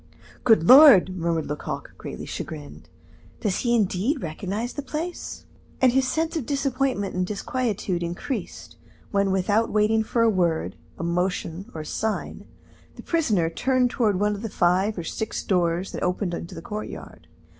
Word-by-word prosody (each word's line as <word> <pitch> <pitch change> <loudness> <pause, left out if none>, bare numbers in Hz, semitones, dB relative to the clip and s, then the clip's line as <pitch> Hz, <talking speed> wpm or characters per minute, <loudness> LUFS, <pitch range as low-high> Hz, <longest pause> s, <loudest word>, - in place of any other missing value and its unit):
"Good 225 -9 +5
Lord!" 255 - +9
murmured 165 -2 -1
Lecoq, 150 +1 -5
greatly - - -7
chagrined, 75 +2 -7 0.5
"does 200 -4 0
he 240 -1 +2
indeed 220 - 0
recognize 195 +9 -4
the 285 - -4
place?" 315 +6 -5 0.3
And 260 -1 +5
his 260 +1 +2
sense 320 +5 -1
of 300 -8 -3
disappointment 270 -7 -1
and 185 - 0
disquietude 210 - -2
increased 175 +10 -5 0.3
when, 200 -1 +2
without 205 +4 +1
waiting 215 +1 +2
for 230 +1 +1
a - - +5
word, 175 -6 +1 0.2
a - - -5
motion, 180 +2 -2
or 160 - -4
a - - -8
sign, 220 +7 -3 0.5
the - - -11
prisoner 215 - +1
turned 250 +8 +1
toward 215 -8 +1
one 210 +1 +2
of 205 - -6
the 225 - -4
five 190 +4 +1
or 170 - -3
six 220 +6 -4
doors 175 -1 0
that - - -6
opened 180 0 -1
into 170 - -6
the - - -8
courtyard. 215 -3 -7
205 Hz, 160 wpm, -24 LUFS, 180-245 Hz, 0.5 s, Lord